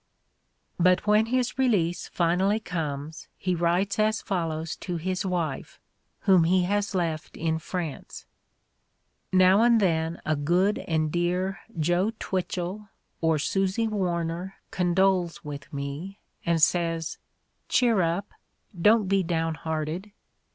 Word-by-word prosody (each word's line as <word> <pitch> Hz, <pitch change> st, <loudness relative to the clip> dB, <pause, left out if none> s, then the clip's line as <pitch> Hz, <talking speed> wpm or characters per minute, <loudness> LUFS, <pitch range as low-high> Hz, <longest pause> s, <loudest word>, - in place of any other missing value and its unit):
But 185 Hz, +2 st, +4 dB
when 210 Hz, +1 st, +4 dB
his 255 Hz, +1 st, -1 dB
release 195 Hz, -10 st, +1 dB
finally 185 Hz, +5 st, +1 dB
comes 155 Hz, -5 st, -5 dB
he 185 Hz, -1 st, -1 dB
writes 175 Hz, +4 st, +1 dB
as 215 Hz, +1 st, +2 dB
follows 165 Hz, -4 st, -2 dB
to 180 Hz, -2 st, -4 dB
his 185 Hz, +3 st, -2 dB
wife, 170 Hz, -7 st, -3 dB, 0.4 s
whom 185 Hz, -4 st, +5 dB
he 180 Hz, +2 st, +3 dB
has 205 Hz, +2 st, -1 dB
left 165 Hz, -3 st, -2 dB
in 160 Hz, 0 st, 0 dB
France: 165 Hz, -3 st, -6 dB, 1.1 s
"Now 185 Hz, +2 st, +5 dB
and 235 Hz, -1 st, +5 dB
then 165 Hz, -3 st, 0 dB
a 155 Hz, -, +1 dB
good 175 Hz, +8 st, +2 dB
and 155 Hz, -2 st, -1 dB
dear 180 Hz, +3 st, 0 dB, 0.2 s
Joe 175 Hz, +7 st, +1 dB
Twitchell 190 Hz, +2 st, -3 dB, 0.3 s
or 160 Hz, -1 st, +3 dB
Susy 195 Hz, +7 st, 0 dB
Warner 180 Hz, -2 st, -2 dB, 0.2 s
condoles 185 Hz, 0 st, +1 dB
with 145 Hz, -1 st, -7 dB
me 140 Hz, +8 st, -5 dB, 0.3 s
and 170 Hz, -1 st, +3 dB
says, 165 Hz, -1 st, +1 dB, 0.5 s
'Cheer 235 Hz, -6 st, +3 dB
up 175 Hz, +4 st, -1 dB, 0.3 s
— 175 Hz, -, -14 dB
don't 215 Hz, 0 st, +6 dB
be 195 Hz, 0 st, +3 dB
downhearted' 165 Hz, +2 st, -2 dB
180 Hz, 125 wpm, -26 LUFS, 165-195 Hz, 1.1 s, don't